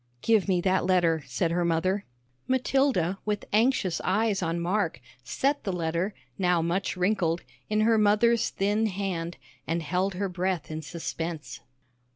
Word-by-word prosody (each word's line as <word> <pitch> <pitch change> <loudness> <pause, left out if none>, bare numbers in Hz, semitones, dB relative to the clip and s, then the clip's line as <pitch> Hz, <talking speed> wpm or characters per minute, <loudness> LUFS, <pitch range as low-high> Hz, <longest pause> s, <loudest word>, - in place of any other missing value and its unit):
"Give 220 -3 +3
me 180 -2 +2
that 190 +1 +2
letter," 170 -4 +3
said 130 +7 0
her 175 +1 +1
mother. 175 +4 0 0.4
Matilda, 260 - +1
with 210 -1 -2
anxious 220 -5 +2
eyes 210 +1 +1
on 165 0 -1
Mark, 175 -5 0 0.2
set 275 - 0
the 195 - -1
letter, 170 +3 -1 0.2
now 180 -2 +3
much 175 +4 -1
wrinkled, 180 -3 +1 0.3
in 215 0 +2
her 225 0 +4
mother's 215 +3 +3
thin 205 +3 +1
hand, 180 -4 -3 0.3
and 165 +1 -1
held 185 +4 0
her 200 +2 -1
breath 180 -3 -2
in 155 0 -4
suspense. 160 -3 -5
185 Hz, 150 wpm, -27 LUFS, 170-210 Hz, 0.4 s, her